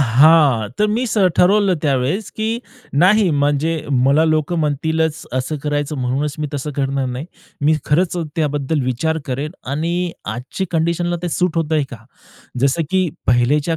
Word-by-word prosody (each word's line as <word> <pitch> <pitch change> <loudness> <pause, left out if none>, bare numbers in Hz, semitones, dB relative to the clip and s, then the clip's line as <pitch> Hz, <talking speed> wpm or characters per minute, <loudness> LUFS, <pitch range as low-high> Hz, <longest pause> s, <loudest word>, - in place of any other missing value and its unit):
हां, 135 -2 +5
तर 210 - +3
मी 235 +4 0
स 215 - -1 0.2
ठरवलं 195 0 +4
त्यावेळेस, 145 +8 0
की 220 +2 -1 0.3
नाही, 185 +7 +4
म्हणजे 145 +2 +1 0.3
मला 145 +4 +4
लोकं 155 +2 +1
म्हणतीलच 160 +1 0
असं 130 +4 -2
करायचं, 145 0 -2
म्हणूनच 135 +4 -1
मी 150 - -1
तसं 145 +2 -3
करणार 135 -1 0
नाही. 125 +5 -5 0.3
मी 155 +2 +3
खरंच 175 +4 +1 0.2
त्याबद्दल 145 -1 0
विचार 145 +6 -1
करेन 140 +4 -3 0.2
आणि 170 +3 -1 0.2
आजच्या 130 +10 -4
कंडिशनला 170 +1 0
ते 175 - -1
सूट 180 +1 0
होतंय 155 -2 +1
का, 115 -3 -10 0.6
जसं 140 +5 +2
की 185 -2 +2 0.2
पहिलेच्या 140 +7 +2
155 Hz, 150 wpm, -19 LUFS, 140-170 Hz, 0.6 s, हां